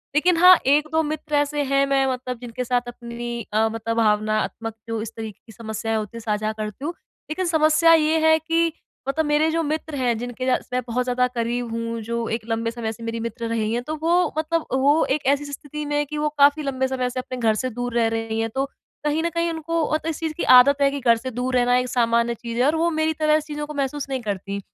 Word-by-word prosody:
लेकिन 335 +3 +3
हाँ, 365 +1 +9
एक-दो 300 +3 +3
मित्र 300 0 -3
ऐसे 290 0 +1
हैं 275 0 +4
मैं 270 0 +3
मतलब 255 -1 -3
जिनके 245 +1 -5
साथ 245 0 +1
अपनी 235 0 -6
अ, 220 +1 +3
मतलब 225 +1 -3
भावनात्मक 215 +1 0
जो 225 -1 -2
इस 225 0 -6
तरीके 220 -2 -7
की 225 - -14
समस्याएँ 225 0 -3
होती 215 +1 -5
हैं - - -7
साझा 215 -1 -1
करती 215 +6 -5
हूँ। 335 - -2 0.4
लेकिन 370 +4 -2
समस्या 320 0 +4
ये 315 0 +3
है 315 0 +6
कि 330 +1 +1 0.4
मतलब 310 +4 0
मेरे 295 +2 +2
जो 330 +1 +1
मित्र 310 0 -3
हैं 245 -4 0
जिनके 245 +2 -5
ज्या 255 - +3 0.2
मैं 250 - +1
बहुत 245 +2 0
ज़्यादा 250 0 +1
करीब 240 0 -2
हूँ, 230 0 -3
जो 235 +1 -3
एक 225 +1 -2
लंबे 230 0 -1
समय 230 -2 -4
से 230 - -12
मेरी 230 0 -3
मित्र 230 +1 -4
रही 225 -1 -1
हैं, 240 - 0
तो 310 +4 -4
वो 345 +2 +2
मतलब 325 +1 0
वो 280 +4 +4
एक 300 - -6
ऐसी 285 +2 +2
स्थिति 295 +1 -6
में 290 0 -2
है 295 - +2
कि 300 +2 -6
वो 300 0 0
काफ़ी 285 +2 +5
लंबे 265 -2 -1
समय 255 -1 -1
से 255 +1 -4
अपने 255 0 -6
घर 225 -2 +2
से 255 +3 -2
दूर 245 0 -4
रह 230 -1 +3
रही 225 0 -2
हैं, 225 0 0
तो 265 +4 -1 0.4
कहीं 300 +2 +1
न 340 - +1
कहीं 335 +1 -1
उनको 330 +1 -2
मतलब 315 +1 -1
इस 320 - -4
चीज़ 320 -1 -2
की 340 - -4
आदत 280 +3 +5
है 275 - +5
कि 280 - -3
घर 235 -3 +4
से 255 +2 -6
दूर 250 +2 -2
रहना 245 0 +3
एक 250 0 0
सामान्य 235 -1 +2
चीज़ 235 0 -6
है 250 - +3
और 300 +3 +3
वो 330 +1 +2
मेरी 315 0 0
तरह 310 0 +2
चीज़ों 300 -1 -5
को 300 - -7
महसूस 280 0 -2
नहीं 265 -1 -2
करतीं। 200 -2 -4
255 Hz, 245 wpm, -23 LUFS, 230-300 Hz, 0.4 s, हाँ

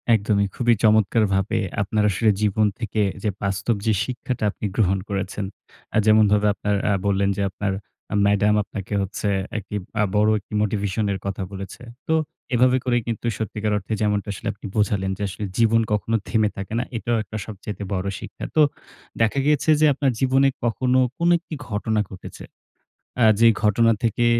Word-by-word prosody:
একদমই। 100 -1 +1
খুবই 120 -1 +3
চমৎকারভাবে 105 -1 +3 0.2
আপনার 105 +1 0
আসলে 110 +3 +2
জীবন 105 0 +2
থেকে 110 -2 -1 0.2
যে 105 - +1
বাস্তব 100 +4 0
যে 110 - +3
শিক্ষাটা 125 -2 -4
আপনি 105 - -7
গ্রহণ 95 -3 +2
করেছেন, 100 0 -3 0.5
আ - - +4
যেমনভাবে 105 -1 +4
আপনারা 105 0 -1
আ - - +3
বললেন 100 0 +2
যে - - -1
আপনার 100 +1 -3 0.5
ম্যাডাম 105 +1 +3
আপনাকে 100 0 -7
হচ্ছে 100 +2 -3 0.3
একটি 105 0 -6 0.3
আ - - +4
বড় 105 +1 +4
একটি 105 - -16
মোটিভেশন 105 0 -1
এর 95 - -4
কথা 100 -1 -3
বলেছে। 95 0 -8 0.3
তো 160 - +2 0.4
এভাবে 125 +1 +4
করে 120 -1 +2
কিন্তু 115 0 -3
সত্যিকার 105 -1 -2
অর্থে 105 +2 -4
যেমনটা 105 -1 0
আসলে - - -7
আপনি 100 - -13
বোঝালেন 100 -2 +1
যে - - -9
আসলে 95 +3 -7
জীবন 115 0 +4
কখনো 110 +2 0
থেমে 110 -2 +2
থাকে 100 +2 -6
না। - - 0
এটাও 115 +1 0
একটা 105 +2 -7
সবচাইতে 105 -1 -7
বড় 95 0 -2
শিক্ষা। - - -9
তো 155 - +5 0.6
দেখা 115 +5 +2
গিয়েছে 150 +1 +2
যে - - +6
আপনার 135 0 +1
জীবনে 135 +1 +3 0.2
কখনো 125 +2 +2 0.2
কোনো 170 +1 +2
একটি 170 - -11 0.2
ঘটনা 110 +1 -1
ঘটেছে। 95 -2 -10 0.8
আ - - +6 0.2
যে 115 - +7 0.2
ঘটনা 115 +2 +4
থেকে 120 +1 +1
105 Hz, 170 wpm, -23 LUFS, 100-115 Hz, 0.8 s, যে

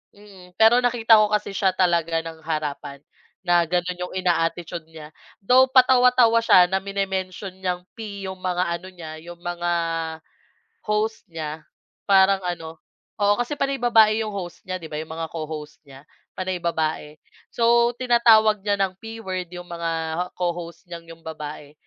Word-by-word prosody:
mm. 190 -3 -16
Pero 225 +3 +6
nakita 230 -2 +4
ko 215 - +4
kasi 210 -1 -3
siya 190 -2 0
talaga 170 -3 +1
ng 165 -1 -9
harapan 150 -2 -4 0.4
na 175 -2 +3
gano'n 180 +1 -1
yung 180 +1 -5
ina-attitude 175 -2 -1
niya 155 -2 -12 0.3
though 255 +5 +5
patawa-tawa 250 -2 +5
siya 180 -5 +5
na 190 - +2
mini-mention 190 -1 -4
niyang 180 -1 -3 0.2
P 200 -3 -7
yung 190 0 -6
mga 180 -1 -1 0.2
ano 185 - -12
niya, 160 -4 -9
yung 175 +1 -12
mga 175 0 -2 1.2
host 215 +1 -1
niya 155 -2 -7 0.4
parang 195 0 +5
ano, 165 -2 -5 0.4
oo, 205 0 +3
kasi 290 +4 -6
panay 275 0 0
babae 225 -2 +4
yung 215 - -4
host 185 -4 -7
niya, 185 -1 -5
di 165 - -9
ba, 155 - -9
yung 160 - -12
mga 165 0 -4
co-host 155 -1 -7
niya 140 0 -16 0.3
panay 185 -1 -3
babae, 155 -2 -2 0.3
so 235 0 +3
tinatawag 225 -4 +4
niya 205 -1 +1
ng 195 -1 +1
P 225 0 -8
word 185 -2 -4
yung 175 0 -8
mga 165 -1 -3 0.2
co-host 175 0 -4
niyang 170 -1 -10
yung 165 - -27
babae, 150 -2 -8
180 Hz, 160 wpm, -23 LUFS, 165-210 Hz, 1.2 s, Pero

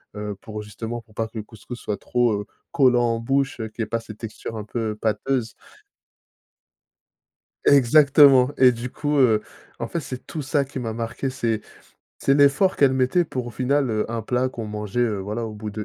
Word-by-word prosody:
heu, 105 -1 -4
pour 105 -1 -7
justement 110 +3 -6
pour 110 -1 -24
pas 115 0 -2
que 110 - -11
le 105 - -4
couscous 120 +3 -10
soit 105 - -3
trop, 120 -2 +1
heu, - - -9 0.3
collant 125 -3 +4
en - - -4
bouche, 135 +3 0
qu'il 110 -1 -5
y - - +1
ait - - -2
pas 115 +2 -2
cette 110 -2 -11
texture 115 0 -7
un 105 - -4
peu 110 -1 -3
pâteuse. 115 +2 -1 2.1
Exactement 140 -1 +6
et 130 -1 +7
du 120 +1 -5
coup, 145 +1 -1
heu, 110 -5 +4 0.4
en - - -4
fait, 170 - -3
c'est 130 -3 -7
tout 155 - -5
ça 140 0 0
qui 135 -1 -7
m'a 115 -2 -3
marqué, 115 +4 -3
c'est 115 -5 -1 0.6
c'est 135 - +3
l'effort 145 +7 +4
qu'elle 135 -2 +4
mettait 130 +7 +2
pour 125 -5 -4
au - - -5
final, 135 +3 +1
heu, 110 +1 -1
un 115 -1 -2
plat 125 +3 0
qu'on 115 -3 -6
mangeait, 105 +1 -5
heu, 110 -4 +1
voilà 105 +4 -3
au 110 - -7
bout 105 0 -6
de 105 +1 -5
120 Hz, 205 wpm, -23 LUFS, 110-135 Hz, 2.1 s, et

